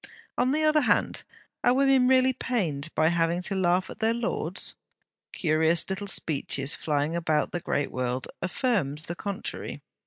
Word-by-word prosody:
On 250 +1 +2
the 305 +3 +1
other 305 0 +4
hand, - - +1 0.4
are 245 - +4
women 270 -2 +4
really 260 0 +4
pained 170 - -2
by 155 +1 +4
having 170 0 +1
to 195 - -1
laugh 180 0 +2
at - - -10
their 225 +1 +2
lords? 235 0 -2 0.6
Curious 160 0 +2
little 200 +1 -3
speeches 145 -5 0
flying 150 +1 -1
about 160 -3 0
the 175 - -2
great 145 -3 -1
world, 125 0 -2
affirmed 185 - 0
the 170 - -3
contrary. 200 +1 -5
175 Hz, 155 wpm, -27 LUFS, 155-245 Hz, 0.6 s, other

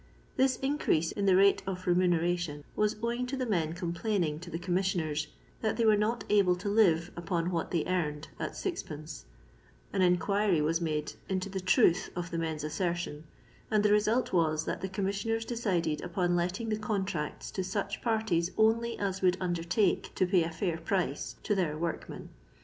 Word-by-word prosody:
This 260 -1 +3
increase 270 - +1
in 200 -1 -1
the 190 - +6
rate 195 +1 +5
of 185 -1 -4
remuneration 175 -3 +1
was 210 0 +1
owing 240 +2 -1
to 270 +2 -3
the 255 - -1
men 165 -8 0
complaining 170 -2 -1
to 175 +1 -9
the 165 - -3
com 175 +1 -3
missioners 165 -5 0 0.3
that 220 - 0
they 230 - +2
were 215 -1 +6
nd 215 +3 0
able 195 -4 +4
to 180 +3 -4
live 175 -6 +3
upon 170 0 -1
what 170 -2 -1
they 170 -4 0
earned 155 -5 -1
at - - -3
Qd,; 155 - -5 0.7
an - - +1
enquiry 185 +1 +3
was 160 +3 +1
made 155 -2 -2 0.2
into 190 0 -1
the 190 0 -3
truth 185 -1 +3
of 175 0 -4
the 165 - -2
men's 160 -2 -3
assertion, 160 -1 -2 0.4
and 210 -1 +3
the 210 - +4
re 210 - +6
sult 225 +3 0
was 160 -2 +2
that - - -3
the 190 - -3
commisidners 200 +4 -1
decided 185 -10 -1
upon 175 0 0
letting 180 +6 -1
the 215 0 -1
contracts 195 -8 -3
to 190 - -2
such 200 +1 -3
parties 220 -7 +1
only 230 +2 +2
as 195 -1 -2
would 180 -1 +3
under 175 -2 -1
"take 180 +3 +1
to 185 - +3
pay 180 0 +3
a 165 - 0
fiur 165 -1 -3
price 175 -5 -1
to 210 - +1
their 170 -6 0
workmen. 165 +1 -4
180 Hz, 185 wpm, -30 LUFS, 165-210 Hz, 0.7 s, the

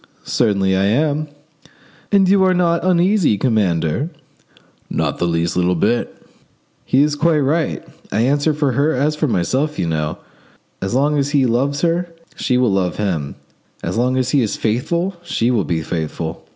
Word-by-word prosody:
"Certainly 100 -4 +1
I 95 +1 +2
am." 150 +7 +1 0.8
"And 195 -2 +4
you 195 0 +4
are 185 -1 +3
not 170 -2 +1
uneasy, 185 - +3
commander?" 100 - 0 0.8
"Not - - -2
the 85 - +1
least 85 0 -1
little 90 0 +2
bit." 110 +8 -1 0.6
"He 135 +2 +3
is 150 0 +1
quite 155 0 +2
right. 155 +4 0 0.3
I 105 - +1
answer 145 +5 +2
for 145 -3 +1
her 145 +6 +1
as 145 +4 +1
for 150 0 0
my 90 -8 +1
self, 145 - -1
you 90 - -1
know; 80 -1 -2 0.6
as 95 +4 -2
long 145 +2 +2
as 140 0 0
he 135 - +3
loves 135 +4 0
her 175 +1 0 0.3
she 125 -2 0
will 125 -4 +2
love 95 -2 0
him; 85 -9 -2 0.5
as - - -3
long 125 +3 +1
as 130 -1 0
he 140 - +3
is 110 - -1
faithful 170 - -1
she 125 -8 0
will 110 -8 +1
be 80 +1 -2
faithful. 80 0 -4
130 Hz, 175 wpm, -18 LUFS, 95-155 Hz, 0.8 s, And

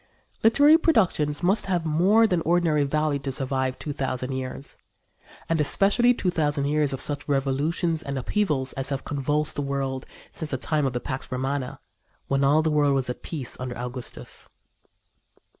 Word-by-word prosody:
Literary 290 +8 +6
productions 180 - +1
must 195 +4 +2
have 175 -3 0
more 185 +9 +4
than 180 -6 +1
ordinary 165 -3 +2
value 150 0 0
to 135 0 -4
survive 130 -1 -1
two 150 - -5
thousand 130 -1 -3
years, 130 +1 -6 0.7
and 165 -1 0
especially 205 - +3
two 195 -7 0
thousand 145 -4 0
years 150 0 +1
of 135 - -4
such 145 +1 0
revolutions 145 +4 +1
and 140 -2 -4
upheavals 135 - 0
as 135 0 -1
have 135 -2 -3
convulsed 145 +2 0
the - - 0
world 135 -1 -3 0.2
since 160 - -6
the 130 - -1
time 150 +2 0
of 130 - -3
the 120 - -1
Pax 130 +1 -6
Romana, 130 +1 -3 0.5
when 135 0 +1
all 145 +3 +4
the 160 - +1
world 145 -2 +3
was 130 -2 0
at - - -9
peace 145 -7 -3
under 125 -1 -5
Augustus. 125 +1 -5
145 Hz, 170 wpm, -25 LUFS, 135-165 Hz, 0.7 s, Literary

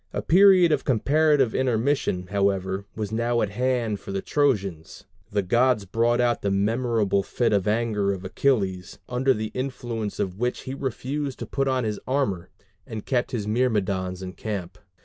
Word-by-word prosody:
A - - -3
period 185 -1 +6
of 145 -3 +1
comparative 140 +1 +2
intermission, 125 -6 0
however, 100 -1 0
was 105 -2 -4
now 115 +1 +1
at 105 - -2
hand 120 -2 0
for - - -8
the 95 0 -3
Trojans. 100 - -1 0.3
The 100 -1 0
gods 120 +2 +2
brought 115 +5 +1
about 120 -1 +1
the 100 - 0
memorable 105 0 +1
fit 115 +3 0
of 100 -2 +1
anger 105 -2 +1
of 95 -1 -5
Achilles, 95 -5 0
under 125 +2 +1
the 110 0 -4
influence 120 -5 -4
of 95 +1 -2
which 125 +1 -1
he 130 - -6
refused 135 +1 -3
to - - -5
put 135 -1 -1
on 130 -1 +1
his 105 -2 -2
armor, 105 -10 -1 0.4
and 110 -3 -6
kept 125 -2 0
his 110 -5 -3
Myrmidons 100 -5 0
in 90 0 -6
camp. 95 -5 -5
115 Hz, 170 wpm, -25 LUFS, 100-130 Hz, 0.4 s, period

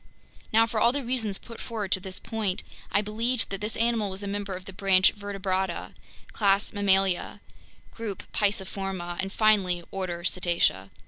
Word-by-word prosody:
Now, 225 +1 +6
for 230 -1 -2
all 235 - +5
the 280 +1 -2
reasons 230 -5 -1
put 230 -1 -11
forward 215 -5 -4
to - - +4
this 185 0 -5
point, 215 -5 -2 0.3
I 205 - +3
believed 225 +3 0
that 195 0 -3
this 210 +1 -2
animal 230 -3 +1
was 190 +1 -6
a - - -3
member 200 -1 -3
of 185 0 -9
the 195 - -8
branch 190 -1 +4
Vertebrata, 190 -3 -2 0.4
class 200 0 +2
Mammalia, 195 -2 +2 0.5
group 220 -5 -5
Pisciforma, 195 -3 -1
and 195 0 -1
finally, 195 -6 +3
order 180 -3 -3
Cetacea. 170 - +1
200 Hz, 165 wpm, -27 LUFS, 190-215 Hz, 0.5 s, Now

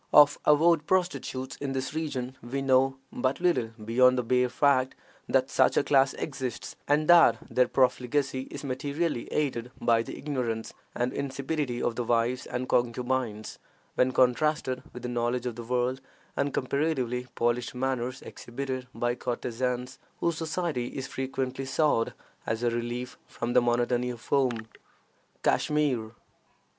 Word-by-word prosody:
Of 145 -1 +7
avowed 155 +1 +4
prostitutes 175 -8 -1
in 140 -1 -3
this 135 +1 -3
region 135 -5 -3
we 135 +4 -3
know 135 0 +3 0.2
but 130 +1 0
little 175 -10 +2 0.2
beyond 125 +3 +5
the 125 - +1
bare 125 +1 +2
fact 130 0 +2 0.3
that - - +2
such - - +3
a - - +4
class 135 -1 +3
exists, 130 -5 -5
and 150 +2 +2
that 175 -1 +7
their 125 0 +3
profligacy 130 +1 +1
is 140 - -7
materially 140 +2 -2
aided 125 -5 -1
by 115 -1 +3
the - - -7
ignorance 125 -6 -3 0.2
and 125 +1 -1
insipidity 140 -1 -2
of 115 - 0
the 120 - 0
wives 120 +2 0
and 125 +1 -3
concubines, 120 -2 -1 0.3
when 130 0 +2
contrasted 130 +1 +2
with 125 - -9
the - - -2
knowledge 120 +1 -1
of 120 -2 -3
the 120 - -6
world 125 +2 -1 0.3
and 140 0 0
comparatively 130 -3 -1
polished 120 +1 0
manners 130 -1 -2
exhibited 130 +1 -5
by 120 0 0
courtesans, 125 +1 -3 0.2
whose 170 -1 +1
society 160 -5 -2
is 130 +1 -5
frequently 130 0 -3
sought 130 -4 +1 0.3
as 110 +2 -1
a 120 - +2
relief 120 +1 -4
from 120 +1 -3
the - - +6
monotony 120 +1 +1
of 120 -1 -7
home. 125 -5 +1 0.8
KASHMIR. 135 -7 +1
130 Hz, 145 wpm, -28 LUFS, 120-140 Hz, 0.8 s, Of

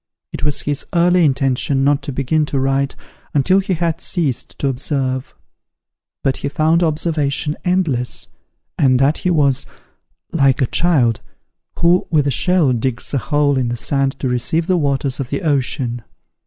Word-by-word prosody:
It - - -6
was 150 -2 +1
his 145 0 -2
early 175 +1 +4
intention 135 -1 +1
not 145 +1 +2
to 140 - -5
begin 140 +4 0
to 140 - -1
write 135 +1 0 0.4
until 185 +7 +4
he 190 -1 -1
had 165 -1 -2
ceased 155 -9 -2
to 140 - -1
observe; 130 -1 -2 0.9
but 135 - +1
he - - -3
found 155 +4 +2
observation 155 -2 0
endless, 165 -10 0 0.5
and 130 -2 +4
that 135 +4 +2
he 180 - -1
was 140 -5 +1 0.6
"like 135 -4 +2
a 130 - +3
child 125 -7 +1 0.6
who 175 +2 +3
with 150 -3 +2
a 140 - +1
shell 175 -4 +2
digs 120 +2 -1
a 140 - +2
hole 145 0 +1
in 125 -2 -1
the 120 - -3
sand 135 +2 0
to 135 - 0
receive 125 +7 0
the 185 - +1
waters 140 -4 -1
of 130 -3 -4
the 140 - -3
ocean." 130 -5 -1
140 Hz, 165 wpm, -18 LUFS, 135-160 Hz, 0.9 s, early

